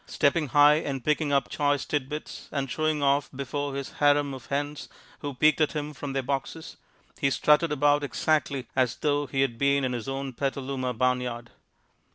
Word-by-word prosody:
Stepping 150 +1 +1
high 145 +2 +6
and 135 -5 -4
picking 150 -1 +1
up 140 -1 +2
choice 145 -2 0
tidbits 150 +1 -4
and 135 -3 -2
showing 155 -2 0
off 140 +1 +2
before 140 +1 -3
his 140 -1 -5
harem 145 -1 +3
of 130 -1 -10
hens 145 +1 -3 0.3
who 145 -2 -5
peeked 155 +4 +3
at 155 - +2
him 150 -1 -4
from 140 -1 -6
their 135 -1 -1
boxes, 140 +4 -4 0.4
he 135 - +2
strutted 150 +3 +3
about 145 0 +3
exactly 145 -2 0
as 125 -3 +2
though 145 -1 0
he 135 0 -1
had 120 -4 0
been 140 0 +2
in 125 - -1
his 120 +1 -4
own 135 0 -4
Petaluma 135 -1 -2
barnyard. 125 -1 -1
140 Hz, 180 wpm, -27 LUFS, 135-145 Hz, 0.4 s, high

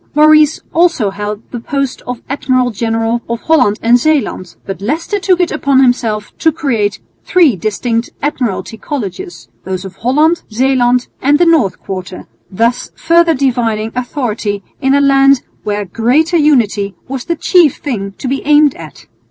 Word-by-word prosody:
Maurice 305 0 +5
also 330 - +2
held 205 +2 -5
the 240 - -5
post 275 +2 -3
of 245 -1 -5
Admiral 255 -2 0
General 225 +2 -1
of 235 -1 -3
Holland 255 -11 +2
and 240 +2 +4
Zeeland, 280 - -1
but 195 0 -6
Leicester 325 - -2
took 370 -2 +1
it 355 - +1
upon 280 -3 +1
himself 225 -4 -1
to 320 - +3
create 225 -10 -1 0.2
three 330 - +3
distinct 230 +5 -2
Admiralty 245 -6 -3
Colleges, 190 - -6 0.2
those 190 0 -5
of 190 - -10
Holland, 305 +8 +2
Zeeland, 250 +1 +2 0.2
and 285 +2 +3
the 350 - +3
North 290 - +2
Quarter, 185 -1 -7 0.2
thus 230 +5 -1
further 335 -1 +3
dividing 230 -5 -1
authority 230 -6 -3 0.2
in 270 0 +2
a 285 - +3
land 275 -1 +4 0.2
where 210 -1 -2
greater 250 - +1
unity 225 - +2
was 265 -1 -5
the 340 - -1
chief 335 -2 +3
thing 200 -8 -4
to 270 - -5
be 275 +2 -1
aimed 295 -1 +4
at. 155 -4 -12
250 Hz, 155 wpm, -14 LUFS, 210-295 Hz, 0.2 s, Maurice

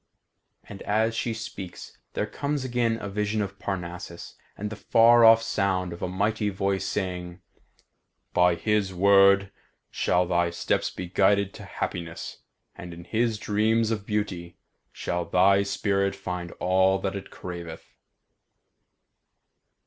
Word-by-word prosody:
And 100 - -10
as 110 +2 +1
she 115 - -1
speaks 95 -4 -8
there - - -1
comes 140 +5 -3
again 120 -2 0
a - - -5
vision 105 +2 -1
of 100 -1 -4
Parnassus 90 -2 -6 0.2
and 105 +1 -4
the - - -5
far 115 +2 +5
off 115 0 +7
sound 95 -4 0
of 85 - -10
a - - -1
mighty 105 +3 0
voice 95 0 -1
saying, 90 -3 -4 0.9
"By 90 -1 +4
his 105 -1 0
word 100 +1 +5 0.4
shall 90 +2 +1
thy 85 -1 +1
steps 85 - -1
be 90 - -6
guided 100 +2 +2
to - - -10
happiness, 85 -1 -5 0.4
and 85 -1 -9
in 85 - -10
his 110 +4 0
dreams 110 +2 +1
of 105 -2 -3
beauty 95 -5 -3 0.3
shall 85 0 -3
thy 95 +3 +4
spirit 100 0 0
find 90 -2 -5
all 95 +1 +2
that 95 0 -3
it 100 - -7
craveth." 85 -2 -8
100 Hz, 135 wpm, -26 LUFS, 90-105 Hz, 0.9 s, off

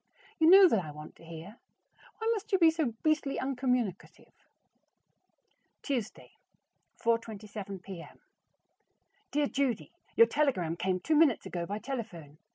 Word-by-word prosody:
You 320 0 +5
know 385 +1 +9
that 220 - +1
I 155 - -8
want 150 +1 -10
to - - -18
hear. 165 +6 -10 0.6
Why 445 - -4
must 440 0 -6
you 385 - +4
be 330 -3 +6
so 310 -8 -2
beastly 305 -3 +1
uncommunicative? 250 -7 -2 1.5
Tuesday, 245 -6 -4 0.6
4:27 210 -4 -3
P.M. 185 -4 -10 1.1
Dear 295 0 +1
Judy: 270 -5 -1 0.2
Your 460 - +8
telegram 255 - 0
came 185 +1 -1
two 315 - +1
minutes 295 -7 +4
ago 170 -1 -4
by 205 - -3
telephone. 210 - -7
230 Hz, 130 wpm, -30 LUFS, 185-295 Hz, 1.5 s, know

